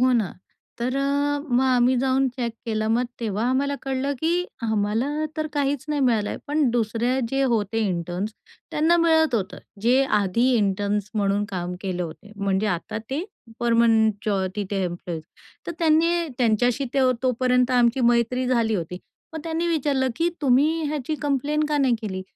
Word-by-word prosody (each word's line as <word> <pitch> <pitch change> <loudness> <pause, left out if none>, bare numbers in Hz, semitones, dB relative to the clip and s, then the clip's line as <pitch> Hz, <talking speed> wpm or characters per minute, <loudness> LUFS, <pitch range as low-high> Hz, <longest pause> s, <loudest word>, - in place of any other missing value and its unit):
हो 255 0 +4
ना. 220 -8 0 0.4
तर 245 +2 -1
अ, 285 +1 +1
मग 245 -1 +3
आम्ही 255 0 +3
जाऊन 265 +1 +2
चेक 245 -2 -4
केलं 215 -1 -1
मग 240 +2 +2 0.2
तेव्हा 220 -1 -1
आम्हाला 280 +2 +1
कळलं 270 +1 -1
की 320 - +1 0.3
आम्हाला 220 +2 0 0.3
तर 310 0 -1
काहीच 285 -2 -1
नाही 300 -1 0
मिळालं 225 -5 +2
आहे - - -5
पण 295 -1 +2
दुसऱ्या 235 +2 0
जे 270 0 +1
होते 225 -4 0
इंटर्न्स 180 +3 -3 0.4
त्यांना 320 +3 +3
मिळत 320 -4 +3
होतं. 200 -3 -2 0.2
जे 245 +5 +4 0.2
आधी 205 +5 +1
इंटर्न्स 205 0 0
म्हणून 205 -1 +1
काम 180 -2 -4
केले 185 -2 -3
होते 175 +5 -9
म्हणजे 200 +1 0
आता 180 +2 -2
ते 285 +5 -1 0.4
परमनंटच 220 -4 +2
तिथे 200 -1 -2
एम्प्लॉईज. 175 -2 -5 0.4
तर - - -3
त्यांनी 335 +1 +2
त्यांच्याशी 245 +3 +2
ते 275 - +3 0.2
तोपर्यंत 250 0 +2
आमची 245 0 +3
मैत्री 240 +1 +2
झाली 230 -3 +1
होती. 180 -1 -4 0.3
मग 320 - -5
त्यांनी 330 +1 -1
विचारलं 285 -5 +1
की 335 - +2
"तुम्ही 295 +4 +3
ह्याची 300 0 -2
कंप्लेन 290 +2 0
का 300 - +1
नाही 265 -4 +3
केली?" 190 -3 -4
245 Hz, 160 wpm, -24 LUFS, 210-275 Hz, 0.4 s, हो